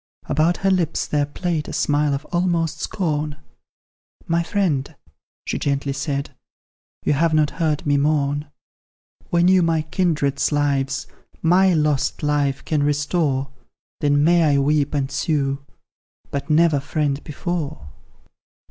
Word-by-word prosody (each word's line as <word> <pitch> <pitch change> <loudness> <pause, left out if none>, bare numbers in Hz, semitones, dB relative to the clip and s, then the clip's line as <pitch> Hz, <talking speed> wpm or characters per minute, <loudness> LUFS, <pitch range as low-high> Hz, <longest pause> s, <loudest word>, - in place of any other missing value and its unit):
About 155 +4 +1
her 195 - +4
lips 175 -4 0
there 145 -1 0
played 160 0 -2
a - - -6
smile 145 -1 +1
of 140 +2 -6
almost 175 -2 0
scorn, 150 -5 -2 0.9
"My 170 +1 +1
friend," 165 -6 -1 0.5
she - - -2
gently 140 -1 -1
said, 140 0 -3 0.7
"you - - +3
have 160 +2 +2
not 150 -1 +3
heard 155 -2 0
me 145 -1 +3
mourn; 145 0 0 0.8
When 175 0 +3
you 185 0 +5
my 165 -2 +1
kindred's 155 -5 0
lives, 140 -1 0 0.4
MY 180 +2 +4
lost 150 -3 0
life, 145 -2 0
can 155 -2 0
restore, 145 -2 0 0.5
Then 145 0 +2
may 170 +1 +4
I - - +3
weep 145 +1 +1
and 135 -1 -1
sue, 140 -1 -1 0.7
but 140 +2 -4
never, 155 -1 +4
friend, 145 0 -2
before! 155 - -4
150 Hz, 130 wpm, -21 LUFS, 140-165 Hz, 0.9 s, you